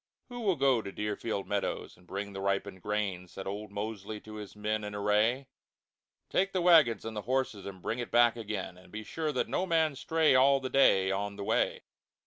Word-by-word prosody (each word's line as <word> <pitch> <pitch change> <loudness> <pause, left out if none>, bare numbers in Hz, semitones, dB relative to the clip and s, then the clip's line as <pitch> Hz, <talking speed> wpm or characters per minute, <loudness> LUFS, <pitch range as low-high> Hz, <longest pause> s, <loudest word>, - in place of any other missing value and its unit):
"Who 245 0 -7
will 200 -6 +2
go 135 -4 +3
to 100 - -7
Deerfield 105 0 -3
Meadows 100 -1 -2
and 90 0 -22
bring 100 +2 -5
the 95 - -5
ripened 100 -1 -1
Grain?" 100 -3 -2
Said 95 +2 -8
old 105 +2 -5
Mosely 105 0 -5
to 110 - -11
his 105 -1 -8
men 105 +1 -2
in 105 0 -5
Array. 105 +6 +2 0.8
"Take 195 +1 +1
the 185 - +1
Wagons 155 - +5
and 115 -1 -5
the 105 - -3
Horses, 125 -5 -1
and 95 -2 -9
bring 115 - -2
it 120 - -4
back 120 -1 +5
again; 105 -5 -5
But - - -18
be 110 +1 -6
sure 155 +7 -2
that 130 - -1
no 185 - -1
Man 160 -4 +2
stray 160 +2 +2
All 135 +2 +5
the 130 -1 -5
Day, 95 -8 +4
on 100 +1 -2
the 100 - -6
Way." - - 0
105 Hz, 210 wpm, -30 LUFS, 100-130 Hz, 0.8 s, Wagons